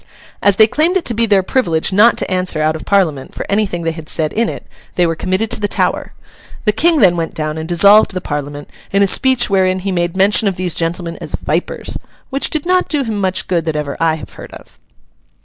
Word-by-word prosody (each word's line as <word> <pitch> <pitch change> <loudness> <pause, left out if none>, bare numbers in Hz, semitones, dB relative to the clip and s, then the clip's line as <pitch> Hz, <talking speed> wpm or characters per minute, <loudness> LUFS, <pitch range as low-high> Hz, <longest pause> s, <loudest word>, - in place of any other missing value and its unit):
As 200 -1 +3
they 220 - +6
claimed 320 - +1
it 355 - -4
to 240 - 0
be 230 +1 +1
their 200 -3 +3
privilege 180 -7 0
not 215 +5 +5
to - - -2
answer 180 -3 0
out 155 +1 +1
of 160 - -9
Parliament 165 -9 0
for - - -5
anything 200 -4 -1
they 165 - -1
had 160 -1 -10
said 155 -2 -2
in 230 0 0
it, - - -8 0.3
they 175 - +2
were 165 -1 -1
committed 190 +7 -2
to 240 - 0
the 205 - 0
Tower. - - -1 0.5
The 210 - +4
King 315 +8 +2
then 180 -4 +5
went 165 -1 -4
down 155 -1 -3
and 160 +2 -7
dissolved 200 +5 +5
the 185 - -2
Parliament, 145 -2 -5 0.2
in 200 +1 +2
a - - +3
speech 260 +5 +2
wherein 185 -2 +1
he 195 +1 -3
made 175 0 -2
mention 205 +3 +4
of 195 - -1
these 180 -2 -2
gentlemen 170 0 -3
as - - -4
'Vipers'—which 285 - -4
did 310 -1 -3
not 365 +1 +2
do 295 -3 0
him 220 -4 -3
much 185 -1 -1
good 170 -2 0
that 160 -2 -2
ever 150 -2 -3
I 165 -1 +2
have 160 - -11
heard - - -11
of. - - -15
185 Hz, 235 wpm, -16 LUFS, 165-215 Hz, 0.5 s, they